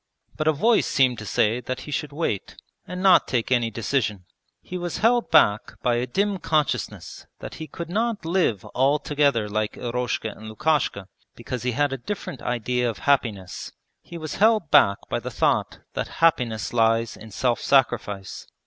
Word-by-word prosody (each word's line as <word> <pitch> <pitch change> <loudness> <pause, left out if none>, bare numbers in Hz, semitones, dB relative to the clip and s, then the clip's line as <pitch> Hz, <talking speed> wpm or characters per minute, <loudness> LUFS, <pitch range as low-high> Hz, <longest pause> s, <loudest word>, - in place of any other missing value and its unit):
but 155 - -2
a - - +6
voice 220 +10 +2
seemed 130 -3 +2
to 110 - -8
say 110 +5 +1
that 130 0 -5
he 150 - -8
should 145 +1 -3
wait, 145 - -3 0.3
and 180 +1 -5
not 185 -3 +6
take 125 -1 -1
any 120 -2 +2
decision. 110 -5 -2 0.3
He 185 - -9
was 175 -2 -3
held 235 +2 +2
back 105 +1 +3
by 120 -1 +2
a 125 +1 -1
dim 200 +8 0
consciousness 155 -3 -2
that - - -8
he 160 - -5
could 170 +4 -7
not 220 +1 -1
live 165 - +1
altogether 140 -3 +2
like 105 0 -2
Eroshka 120 -2 -2
and 110 0 -10
Lukashka 125 -6 0 0.3
because 120 +1 -5
he 125 0 -1
had 145 +2 +1
a 135 - -4
different 160 - -6
idea 125 0 -1
of 115 - -5
happiness 110 -10 -1 0.3
he 170 - -10
was 155 -2 -6
held 215 -6 +3
back 100 0 +6
by - - -1
the - - -6
thought - - 0
that - - -2
happiness 125 -11 +1
lies 115 0 +2
in 110 - -12
self 120 +3 0
sacrifice. 105 -7 0
130 Hz, 175 wpm, -24 LUFS, 115-160 Hz, 0.3 s, a